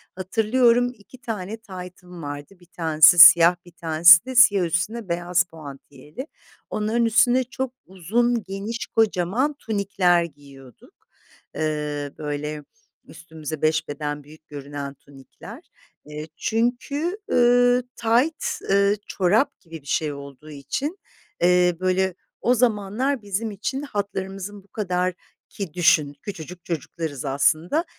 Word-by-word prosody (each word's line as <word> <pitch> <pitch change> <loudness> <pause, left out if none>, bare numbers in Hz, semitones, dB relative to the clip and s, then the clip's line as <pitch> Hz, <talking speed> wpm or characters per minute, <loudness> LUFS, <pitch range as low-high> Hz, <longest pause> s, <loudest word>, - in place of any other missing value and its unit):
hatırlıyorum, 235 +5 +2
2 245 +5 -17
tane 220 -2 -5
taytım 180 -4 -11
vardı, 145 +6 -8
1 175 - -20
tanesi 160 -1 +4
siyah, 170 0 +9
1 175 - -15
tanesi 170 0 +6
de 260 0 -6
siyah 205 -7 +6
üstüne 185 +5 -2
beyaz 175 +1 +1
puantiyeli. 150 - -11 0.4
Onların 225 +2 0
üstüne 240 +3 +3
çok 255 +1 -5
uzun, 225 +6 -1
geniş, 200 +5 -5
kocaman 225 - 0
tunikler 195 -5 +1
giyiyorduk. 140 -5 -14 0.6
Iıı, 150 -2 -3
böyle, 150 0 -5 0.4
üstümüze 155 -1 -8
5 155 0 +1
beden 145 0 -5
büyük 155 +2 -18
görünen 140 -1 -7
tunikler. 140 -1 -14 0.4
Eee, 150 +1 -8
çünkü, 260 - -1
ııı, 245 0 +4
tayt, 240 +8 +1 0.3
ııı, 200 +1 +3
çorap 205 +8 +1
gibi 165 -3 -11
bir 140 - -20
şey 150 -1 -1
olduğu 140 +2 -11
için, 275 - -4 0.4
eee, 180 0 +4
böyle, 185 0 0 0.3
o 245 - +3
zamanlar 235 +3 0
bizim 210 +2 -3
için 265 +7 -4
hatlarımızın 200 -4 -5
bu - - -28
kadar 180 -3 -2 0.4
ki 195 -7 -7
düşün, 155 -5 +3
küçücük 180 -2 -9
çocuklarız 155 -3 -5
aslında 155 - +1
180 Hz, 120 wpm, -23 LUFS, 155-225 Hz, 0.6 s, siyah